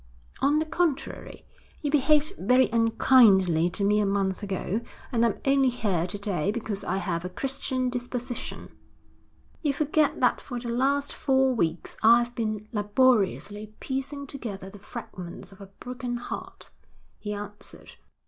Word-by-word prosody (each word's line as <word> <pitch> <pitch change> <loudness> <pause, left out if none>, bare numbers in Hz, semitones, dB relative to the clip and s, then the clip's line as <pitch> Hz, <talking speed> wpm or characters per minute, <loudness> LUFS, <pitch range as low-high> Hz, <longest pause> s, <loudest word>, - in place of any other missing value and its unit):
'On 285 +2 +3
the 310 - +1
contrary, 315 -2 -2 0.4
you 290 - 0
behaved 300 +1 +3
very 250 +7 +4
unkindly 210 -7 +5
to 200 +3 -2
me 210 +1 +3
a 210 - +2
month 195 -1 0
ago, 200 +2 -2 0.3
and 235 -2 +2
I'm 230 -3 +1
only 270 -1 +4
here 195 -8 -1
to 195 - -4
day 200 -4 -1
because 215 -3 -4
I 190 - -1
have 170 -3 -2
a 180 - -4
Christian 255 +4 -2
disposition.' 245 0 -5 0.9
'You 290 -3 +1
forget 305 +1 +1
that 250 - +2
for 245 -3 -5
the 235 0 -6
last 275 +4 +1
four 265 -1 +2
weeks 170 -7 -1
I've 235 +2 +5
been 215 -2 -3
laboriously 210 -2 +1
piecing 280 +1 -4
together 205 -8 -7
the 205 - -12
fragments 190 -6 -9
of 195 +1 -15
a 195 - -9
broken 245 +4 -5
heart,' 240 - -7 0.5
he 210 - -5
answered. 205 0 -9
235 Hz, 150 wpm, -27 LUFS, 200-260 Hz, 0.9 s, unkindly